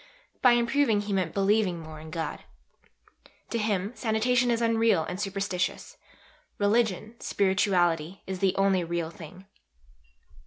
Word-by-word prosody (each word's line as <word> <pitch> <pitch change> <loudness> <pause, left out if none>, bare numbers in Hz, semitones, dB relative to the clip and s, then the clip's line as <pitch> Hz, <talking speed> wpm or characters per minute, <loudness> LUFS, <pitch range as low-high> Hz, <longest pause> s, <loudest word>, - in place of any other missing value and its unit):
By 250 -2 +6
improving 235 -2 +2
he 205 0 -4
meant 185 -4 0
Believing 200 -2 +1
more 155 -1 -9
in 160 +1 -10
God. 160 0 -4 1.1
To 230 - -1
him 205 -2 -1
sanitation 245 +2 +1
is 235 -1 +1
unreal 230 -6 +2
and 180 +4 -5
superstitious; 195 -2 -3 0.6
religion, 215 0 +1
spirituality, 185 -3 +1
is 190 -1 -5
the 190 -1 +2
only 195 -2 +2
real 170 -1 -3
thing." 175 +3 -12
195 Hz, 125 wpm, -27 LUFS, 180-220 Hz, 1.1 s, By